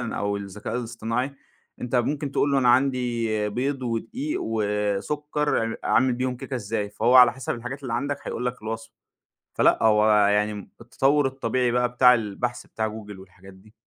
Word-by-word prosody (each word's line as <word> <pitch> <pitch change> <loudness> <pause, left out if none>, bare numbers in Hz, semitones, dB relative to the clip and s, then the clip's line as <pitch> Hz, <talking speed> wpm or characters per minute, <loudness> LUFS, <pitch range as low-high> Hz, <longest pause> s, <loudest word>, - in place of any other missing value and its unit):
أو 100 -4 -2
الذكاء 100 +3 -6
الاصطناعي، 120 +2 -3 0.5
أنت 125 +1 -2
ممكن 140 +3 -1
تقول 140 - +1
له: 140 - +4
"أنا 125 -2 +3
عندي 120 -4 +1
بيض، 130 +5 -2
ودقيق، 225 - -3
وسكر، 110 +8 -1
إعم 115 0 -2
أعمل 130 0 +3
بيهم 125 +1 -2
كيكة 130 - -7
إزاي؟" 105 -3 -3
فهو 115 +4 +1
على 125 -2 +8
حسب 130 -1 -4
الحاجات 125 +4 -7
اللي 130 -4 -4
عندك 140 0 -2
هيقول 125 - -3
لك 125 -2 -4
الوصفة. 110 +1 -6 0.6
فلأ - - +3
هو 110 -1 +4 0.2
يعني 105 +1 +2
امم 105 -2 -9
التطوُّر 135 +4 +1
الطبيعي 130 -2 -1
بقى 125 +1 +1
بتاع 125 +1 +5
البحث 120 +2 -3
بتاع 110 0 -3
Google 105 -2 -9
والحاجات 95 0 -15
دي. 105 +3 -20
120 Hz, 170 wpm, -24 LUFS, 105-130 Hz, 0.6 s, على